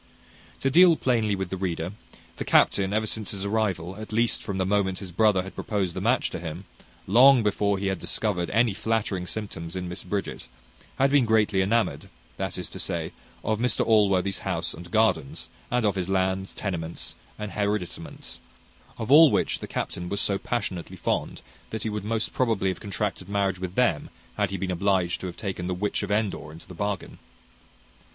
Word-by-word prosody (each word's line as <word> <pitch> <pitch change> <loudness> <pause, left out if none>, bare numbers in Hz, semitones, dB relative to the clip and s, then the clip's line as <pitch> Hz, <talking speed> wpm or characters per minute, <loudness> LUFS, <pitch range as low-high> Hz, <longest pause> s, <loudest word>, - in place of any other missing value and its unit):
To 135 - +1
deal 175 +2 +7
plainly 115 -7 +1
with 95 -2 -4
the 95 - -2
reader, 85 -2 -2 0.5
the - - -2
captain, 95 -1 +3
ever 110 +1 +1
since 110 -1 -2
his 100 -1 -3
arrival, 100 -4 -1
at 110 +1 -8
least 115 +2 +2
from 100 -2 -4
the 95 - +1
moment 95 -1 +1
his 95 -3 -8
brother 100 0 +3
had 95 - -9
proposed 95 -5 -2
the 95 - -3
match 120 +6 +2
to - - -4
him, 85 +3 -6 0.4
long 125 +4 +7
before 100 -1 +1
he 100 - -3
had 95 -2 0
discovered 90 -6 0
any 115 0 +3
flattering 105 -4 -1
symptoms 85 -6 -5
in 90 -1 -3
Miss 90 +1 -6
Bridget, 100 +2 -4 0.5
had 135 +1 +3
been 140 -3 +5
greatly 105 -3 +3
enamoured; 100 -7 0 0.3
that - - -3
is - - -4
to - - -8
say, - - -3 0.3
of 110 -1 0
Mr 120 -1 +2
Allworthy's 100 -4 +3
house - - -1
and 85 +2 -10
gardens, 100 -9 +1 0.2
and 125 -2 +1
of 105 - +3
his 95 -1 -3
lands, 95 0 0
tenements, 85 -5 -3 0.2
and 105 -2 -5
hereditaments; 100 -4 -3 0.6
of 115 +3 -3
all 155 +2 +9
which - - +1
the - - -6
captain 90 0 -4
was 100 +1 0
so 100 -2 +2
passionately 95 -6 -3
fond, - - -2 0.3
that 110 -1 -4
he 110 - -2
would 105 -1 -3
most 110 +1 -1
probably 110 -6 +1
have 95 - -3
contracted 100 -2 -3
marriage 100 -2 0
with 90 0 -5
them, 120 -12 +2 0.3
had 105 -2 +1
he 95 - -3
been 95 -1 -2
obliged 90 -1 +1
to 95 - -3
have 85 -1 -8
taken 95 -3 -4
the 90 - -1
witch 100 +3 -1
of 100 - -4
Endor 105 -7 -1
into 80 +2 -12
the 90 - -10
bargain. 100 +2 -4
100 Hz, 190 wpm, -26 LUFS, 95-110 Hz, 0.6 s, all